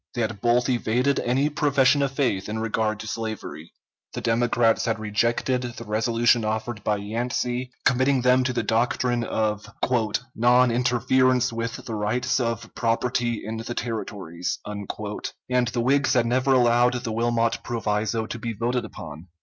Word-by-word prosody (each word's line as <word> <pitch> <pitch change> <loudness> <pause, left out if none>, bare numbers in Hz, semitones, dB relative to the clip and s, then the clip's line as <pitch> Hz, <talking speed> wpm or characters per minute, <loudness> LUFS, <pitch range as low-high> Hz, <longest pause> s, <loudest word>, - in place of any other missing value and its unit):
They 120 - -1
had 110 -3 -3
both 120 +1 +3
evaded 125 +2 +1
any 130 +4 +1
profession 140 -1 +3
of 140 -1 +1
faith 125 -9 -1
in 110 - -3
regard 110 -1 -1
to 110 - -8
slavery. 110 -7 -5 0.4
The - - -4
Democrats 115 0 +2
had 110 -2 0
rejected 115 +4 0
the 120 -2 -6
resolution 115 +2 +2
offered 110 0 -3
by 105 - +1
Yancey 120 +4 -2 0.2
committing 130 0 +3
them 130 0 +4
to 130 - +1
the 125 - -1
doctrine 120 +1 +1
of 105 -2 -1 0.7
"non 125 +2 +4
interference 125 +1 +2
with 115 0 -4
the 115 - -5
rights 120 +5 0
of 115 -2 -3
property 120 -1 -1
in 110 +1 -4
the 115 +2 -5
territories," 100 -7 -4
and 100 -1 -6 0.8
the 120 0 -1
Whigs 140 +4 +2
had 120 -3 +3
never 130 +3 +1
allowed 120 -1 +4
the 115 - -3
Wilmot 115 0 +1
proviso 110 -1 -1
to 120 - -6
be 115 0 -3
voted 120 +3 -1
upon. 80 -5 -9
120 Hz, 155 wpm, -24 LUFS, 110-125 Hz, 0.8 s, them